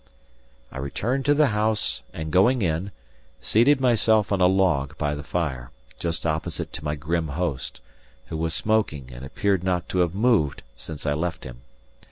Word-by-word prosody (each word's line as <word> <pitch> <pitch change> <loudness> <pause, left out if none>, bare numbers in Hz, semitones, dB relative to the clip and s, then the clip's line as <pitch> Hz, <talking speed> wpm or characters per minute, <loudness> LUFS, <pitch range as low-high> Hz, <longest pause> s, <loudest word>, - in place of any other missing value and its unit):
I 65 - -7
returned 120 - -2
to 145 0 +4
the 150 -2 +4
house 110 0 +1
and, 80 -1 -5
going 115 +7 +4
in, 85 +4 -1 0.5
seated 130 +6 +3
myself 110 -5 +3
on 100 -2 +1
a 90 - +7
log 90 -8 +1
by 75 0 -1
the 75 - -5
fire, 70 -6 -3 0.3
just 85 0 -2
opposite 80 -1 -2
to 75 - -6
my 75 0 -1
grim 80 +3 -1
host, 75 -2 -3 0.4
who 80 - -5
was 80 0 -1
smoking 75 -12 0
and - - -9
appeared 95 +8 0
not 90 -2 0
to 90 - -1
have 90 0 +1
moved 105 - +2
since 75 +5 -8
I 75 - +1
left 85 +3 -3
him. 60 -1 -10
85 Hz, 175 wpm, -24 LUFS, 75-105 Hz, 0.5 s, a